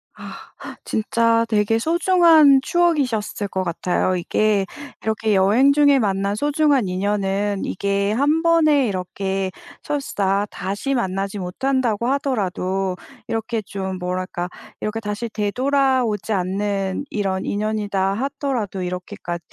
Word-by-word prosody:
아. -, -, -10 dB, 0.4 s
진짜 230 Hz, +1 st, +2 dB
되게 215 Hz, +1 st, +2 dB
소중한 325 Hz, -2 st, +5 dB
추억이셨을 270 Hz, -13 st, 0 dB
것 190 Hz, 0 st, -2 dB
같아요. 180 Hz, +1 st, 0 dB
이게 200 Hz, +3 st, +1 dB, 0.4 s
이렇게 220 Hz, -1 st, 0 dB
여행 225 Hz, +9 st, +4 dB
중에 285 Hz, -1 st, +5 dB
만난 200 Hz, -1 st, 0 dB
소중한 290 Hz, -3 st, +2 dB
인연은 200 Hz, +1 st, -1 dB
이게 200 Hz, +1 st, -1 dB
1 290 Hz, +7 st, +2 dB
번에 310 Hz, -6 st, +4 dB
이렇게 190 Hz, 0 st, -2 dB, 0.3 s
설사 205 Hz, -9 st, -1 dB
다시 200 Hz, +8 st, -3 dB
만나지 195 Hz, -4 st, -2 dB
못한다고 235 Hz, +4 st, -1 dB
하더라도 195 Hz, -8 st, -1 dB, 0.3 s
이렇게 225 Hz, 0 st, -2 dB
좀 190 Hz, -1 st, -5 dB
뭐랄까 180 Hz, 0 st, -3 dB, 0.3 s
이렇게 215 Hz, +1 st, -2 dB
"다시 210 Hz, +2 st, -4 dB
되돌아오지 245 Hz, 0 st, 0 dB
않는 195 Hz, +3 st, -1 dB
이런 190 Hz, -2 st, -2 dB
인연이다" 205 Hz, -2 st, -1 dB
하더라도 235 Hz, -5 st, -3 dB
이렇게까 180 Hz, -1 st, -5 dB
210 Hz, 275 characters per minute, -21 LUFS, 195-265 Hz, 0.4 s, 소중한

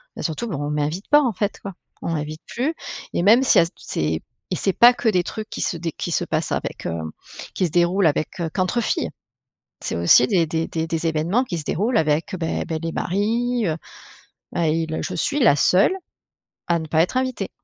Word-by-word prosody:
bah, -, -, -6 dB
surtout, 170 Hz, +8 st, -2 dB
bah, 195 Hz, -, -3 dB
on 145 Hz, +1 st, -3 dB
m'invite 150 Hz, +6 st, -2 dB
pas, 295 Hz, 0 st, +7 dB
en 250 Hz, -6 st, 0 dB
fait, 205 Hz, +2 st, -2 dB
quoi. 195 Hz, -, -7 dB, 0.3 s
On -, -, -2 dB
m'invite 155 Hz, 0 st, -4 dB
plus 270 Hz, +7 st, -1 dB, 0.4 s
et -, -, +1 dB
même 225 Hz, +8 st, +6 dB
c'est -, -, +5 dB
à 170 Hz, -, +5 dB
tou 175 Hz, -, -17 dB
c'est 80 Hz, +1 st, -2 dB, 0.3 s
et 180 Hz, -, -1 dB
c'est 195 Hz, +1 st, 0 dB
pas 240 Hz, +5 st, +8 dB
que 240 Hz, -, -3 dB
des 185 Hz, -4 st, +3 dB
trucs 215 Hz, +4 st, -6 dB
qui -, -, -5 dB
se 170 Hz, -, -1 dB
dé 165 Hz, 0 st, -3 dB
qui 175 Hz, -, -5 dB
se 170 Hz, -, +1 dB
passent 155 Hz, -2 st, -2 dB
avec, -, -, -4 dB
hem, 80 Hz, -2 st, -4 dB, 0.4 s
qui 185 Hz, -, +1 dB
se -, -, -10 dB
déroulent 175 Hz, +2 st, +3 dB
avec, 155 Hz, +3 st, -1 dB
heu, 165 Hz, -2 st, -1 dB
qu'entre 185 Hz, +5 st, 0 dB
filles. -, -, -1 dB, 0.7 s
C'est -, -, -3 dB
aussi 85 Hz, +8 st, +6 dB
des 170 Hz, -4 st, +3 dB
des 160 Hz, +1 st, -1 dB
des 160 Hz, 0 st, -2 dB
des 165 Hz, 0 st, -2 dB
événements 165 Hz, +9 st, +1 dB
qui 180 Hz, -9 st, -4 dB
se 155 Hz, -, -6 dB
déroulent 220 Hz, -, +1 dB
avec, 155 Hz, +4 st, 0 dB
beh 165 Hz, -2 st, -2 dB
beh, 160 Hz, -, -2 dB
les 165 Hz, 0 st, -3 dB
maris, 230 Hz, +5 st, 0 dB
heu, 160 Hz, -2 st, 0 dB, 0.8 s
bah, 170 Hz, -2 st, +1 dB
il, 160 Hz, 0 st, 0 dB
heu, -, -, -2 dB
je -, -, -4 dB
suis 290 Hz, 0 st, 0 dB
la 185 Hz, -, +6 dB
seule 185 Hz, -, +4 dB, 0.7 s
à 170 Hz, -1 st, +2 dB
ne 160 Hz, -, -6 dB
pas 160 Hz, +1 st, +2 dB
être 180 Hz, -, -2 dB
invitée. 255 Hz, -6 st, -1 dB
170 Hz, 230 wpm, -22 LUFS, 160-210 Hz, 0.8 s, pas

